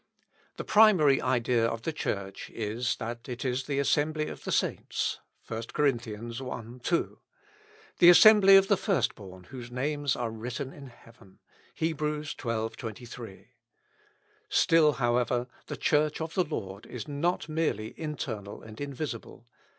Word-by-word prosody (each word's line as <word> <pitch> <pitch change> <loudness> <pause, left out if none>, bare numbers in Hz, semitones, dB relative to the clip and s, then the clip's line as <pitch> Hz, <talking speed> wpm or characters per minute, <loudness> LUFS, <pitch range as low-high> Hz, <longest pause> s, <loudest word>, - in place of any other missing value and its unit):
The - - -4
primary 185 -11 +5
idea 125 -2 +1
of 115 0 -1
the 160 - -2
Church 100 -9 -4
is, 115 +3 -2
that 120 +2 -6
it 125 +2 -5
is 130 +1 -1
the 140 -2 -1
assembly 155 +2 +1
of - - -10
the - - -3
saints, - - -1 0.3
(1 115 0 -4
Cor., 150 - +2
i, - - +7
2,) 120 +4 -4 0.8
the 175 - +9
assembly 195 +1 +8
of 195 0 +6
the 200 - +3
first 195 -4 +1
born 95 -3 -12
whose 120 +3 -9
names 145 +2 -1
are 120 -2 -3
written 125 +4 -5
in 140 -2 -11
heaven. 115 -5 -18 0.4
(Heb., 160 -1 -1
xii, 150 0 -2 0.4
23.) 115 -2 -9 1.0
Still, 155 -2 +4
however, 120 -1 +1 0.2
the - - -5
Church 150 0 +1
of 160 0 -4
the 185 - +2
Lord 100 -9 -6
is 120 -4 -7
not 155 +5 -1
merely 155 -9 -1
internal 115 -10 -5
and 110 +3 -11
invisible. 140 -5 -6
125 Hz, 145 wpm, -28 LUFS, 115-150 Hz, 1.0 s, the